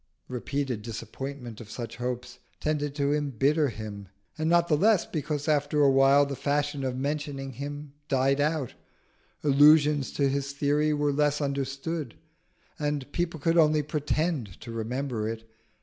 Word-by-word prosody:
Repeated 130 -1 -2
disappointment 120 +1 -7
of 110 - -11
such 120 +1 -6
hopes 125 0 -4 0.2
tended 145 -2 -1
to 140 -1 +1
embitter 145 +1 +1
him, 105 -3 -7 0.3
and 155 +1 -1
not 170 0 +4
the 155 - +3
less 205 +4 +4
because 150 -1 -3
after 150 0 +2
a 140 - +6
while 135 +1 +5
the 140 0 -4
fashion 145 0 -1
of 130 -1 -2
mentioning 140 -1 -3
him 145 +2 -7
died 135 0 +2
out, 150 -4 0 0.7
allusions 150 0 +5
to 140 - +2
his 140 +1 -2
theory 145 +2 +1
were 145 -1 +1
less 145 0 +2
understood, 140 0 -3 0.6
and 145 -2 -2
people 170 -2 -2
could 165 +3 +3
only 155 -1 +4
pretend 150 - -2
to 115 - -8
remember 115 0 -2
it. 115 0 -6
140 Hz, 150 wpm, -27 LUFS, 130-150 Hz, 0.7 s, a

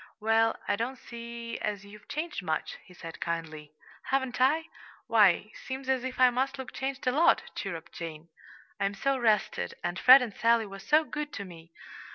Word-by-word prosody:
"Well, 225 +1 +3
I 205 - +2
don't 245 +4 -3
see 235 -1 -7
as 205 -2 -3
you've 210 +1 -14
changed 310 -5 -4
much," 160 -3 -3
he - - -19
said 165 -2 -10
kindly. 160 -3 -4 0.3
"Haven't 265 -2 -1
I? 305 +5 +3 0.4
Why, 215 -2 +4
seems 265 0 -7
as 260 -2 +1
if 260 0 -5
I 255 -1 +7
must 265 +3 -1
look 265 -1 -7
changed 270 0 -4
a 250 - +3
lot," 310 +6 +4
chirruped 170 -5 -6
Jane. 165 -1 -7 0.5
"I'm 200 0 0
so 275 +7 +1
rested, 220 -3 +1
and 175 +1 -2
Fred 255 +1 +9
and 225 -5 -6
Sally 230 -1 +3
were 195 -1 -9
so 300 +10 +3
good 300 -1 -5
to 200 - -5
me! 165 -2 -13
230 Hz, 185 wpm, -29 LUFS, 195-260 Hz, 0.5 s, Fred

